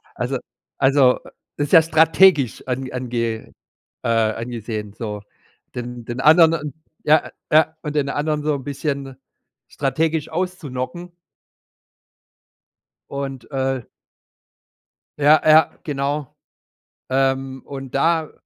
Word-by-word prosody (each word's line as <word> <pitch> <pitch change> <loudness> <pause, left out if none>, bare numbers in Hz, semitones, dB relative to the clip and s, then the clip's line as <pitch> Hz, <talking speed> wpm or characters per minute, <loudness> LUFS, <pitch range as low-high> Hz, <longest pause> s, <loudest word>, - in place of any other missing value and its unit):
Also - - -2 0.4
also, 135 -2 +5
äh, - - -14 0.3
das 145 - 0
ist - - -9
ja 165 - +10
strategisch 160 -3 +4
an 130 +1 -3
ange 120 -3 -3 0.5
äh, - - -2
angesehen, 115 -2 -2
so. 105 -2 -5 0.5
Den 120 -1 -6
den 120 +2 -5
anderen 160 -1 +5 0.3
Ja, 155 +1 +3 0.2
ja. 160 +1 +4
Und 150 -1 -4
den 140 -2 +1
anderen 150 +1 -1
so 150 -1 +1
'n 135 - -6
bisschen 140 -1 -4 0.5
strategisch 155 +2 -1
auszuknocken. 175 -2 -4 2.0
Und, 135 -2 -6
äh 135 -2 -1 1.4
Ja, 150 +2 +6
ja, 155 +1 +5
genau. 145 -1 -3 0.7
Ähm, 135 0 0
und 135 -2 -8
da 160 +2 +1
140 Hz, 105 wpm, -21 LUFS, 125-155 Hz, 2.0 s, ja